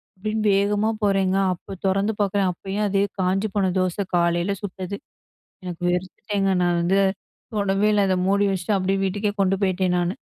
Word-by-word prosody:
அப்டின்னு 215 +3 -2
வேகமா 205 +2 +1
போறேங்க. 195 -2 +2 0.2
அப்ப 190 +2 -10
தொறந்து 195 +3 +1
பாக்குறேன். 200 -1 +1
அப்பயும் 195 +4 -3
அதே 200 0 +2 0.2
காஞ்சு 195 +3 +1
போன 190 -2 +2
தோச, 185 -1 0 0.2
காலைல 175 +3 +1
சுட்டது. 195 -1 -5 0.7
எனக்கு 180 -1 -6
வெறுத்துட்டேங்க, 195 +2 -1
நான் 175 -1 +2
வந்து 190 +3 +2 0.5
தொடவே 200 0 +1
இல்ல. 205 -1 +3
அதை 185 - +2
மூடி 200 +1 +3
வச்சிட்டு, 190 +2 0
அப்டியே 195 +1 0
வீட்டுக்கே 205 +2 -1
கொண்டு 195 0 +3
போய்ட்டேன் 185 -1 +1
நானு. 175 +2 0
195 Hz, 155 wpm, -23 LUFS, 185-200 Hz, 0.7 s, இல்ல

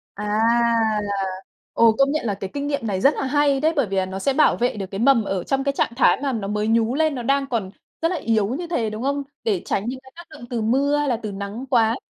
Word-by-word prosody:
À, 210 - -6 0.8
là 200 -1 -2 0.5
ồ, 230 -1 +5
công 275 0 +4
nhận 305 -4 -1
là 205 - 0
cái 195 -1 -6
kinh 285 0 -3
nghiệm 285 -5 -2
này 190 -3 -1
rất 275 +8 +4
là - - -3
hay 280 0 +2
đấy, 315 +2 +2
bởi 280 -6 +2
vì 195 0 -4
là 190 - +1
nó 190 +1 -5
sẽ 275 +8 0
bảo 300 +3 +3
vệ 245 -1 0
được 195 -2 -4
cái 195 - -5
mầm 235 -2 +4
ở 190 -3 -2
trong 270 0 -1
cái 280 - +1
trạng - - 0
thái 270 - +4
mà 275 - 0
nó 215 -5 -3
mới 210 0 -1
nhú 230 +1 +2
lên, 310 0 +1
nó 245 - -4
đang 275 +2 +1
còn 220 -7 -3 0.3
rất 330 - +2
là 365 - -1
yếu 220 -8 0
như 315 +9 -3
thế, 245 -11 -1
đúng 215 +2 -6
không? 280 +1 -1 0.2
Để 200 -6 0
tránh 200 - -1
những 260 +1 -5
cái 265 0 -18
tác 345 0 -12
động 305 -5 -11
từ 235 -3 -2
mưa 275 +6 +2
hay 295 -1 0
là 245 - +1
từ 210 - -4
nắng 200 +5 -6
quá. 230 -1 +3
240 Hz, 285 wpm, -22 LUFS, 210-280 Hz, 0.8 s, ồ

